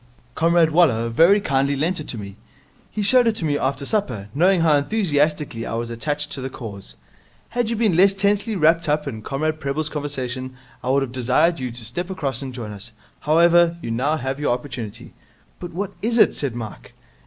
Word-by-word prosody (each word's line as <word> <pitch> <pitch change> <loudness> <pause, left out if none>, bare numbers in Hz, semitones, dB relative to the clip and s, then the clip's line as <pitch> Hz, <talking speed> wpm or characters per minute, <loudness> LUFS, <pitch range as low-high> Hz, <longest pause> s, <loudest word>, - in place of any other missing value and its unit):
'Comrade 165 +1 +3
Waller 130 -9 +3
very 170 - +5
kindly 140 -6 +1
lent 165 +6 0
it 155 - -7
to 120 - -6
me. 100 -2 -8 0.5
He 210 - -3
showed 245 +4 +4
it 225 - +2
to 170 - -3
me 145 -2 +1
after 140 0 -1
supper, 125 - -2
knowing 180 +4 +3
how 160 -2 +4
enthusiastically 150 - 0
I 115 - -4
was 115 0 -3
attached 145 +5 -2
to 135 - -4
the 130 - -4
Cause. 105 -6 -9 0.5
Had 240 -1 -1
you 230 - -1
been 215 -6 +2
less 195 +3 +5
tensely 205 +2 +1
wrapped 165 -1 +3
up 150 0 0
in 110 -5 -5
Comrade 155 +6 -2
Prebble's 150 +1 -2
conversation, 130 -4 -4 0.3
I 125 - -2
would 135 +1 +3
have 130 - -5
desired 130 +7 +2
you 130 -1 -3
to 120 -1 -9
step 175 - -4
across 140 -8 -3
and 135 -1 -5
join 120 -4 -7
us. 105 +3 -9 0.3
However, 170 +2 +4
you 115 - -3
now 140 +7 0
have 135 0 -3
your 145 -5 +1
opportunity.' 125 -5 -8 0.5
'But 175 - -7
what 195 +3 -4
is 230 +2 0
it?' - - +6
asked 130 -5 -2
Mike. 110 -3 -8
145 Hz, 200 wpm, -22 LUFS, 125-175 Hz, 0.5 s, it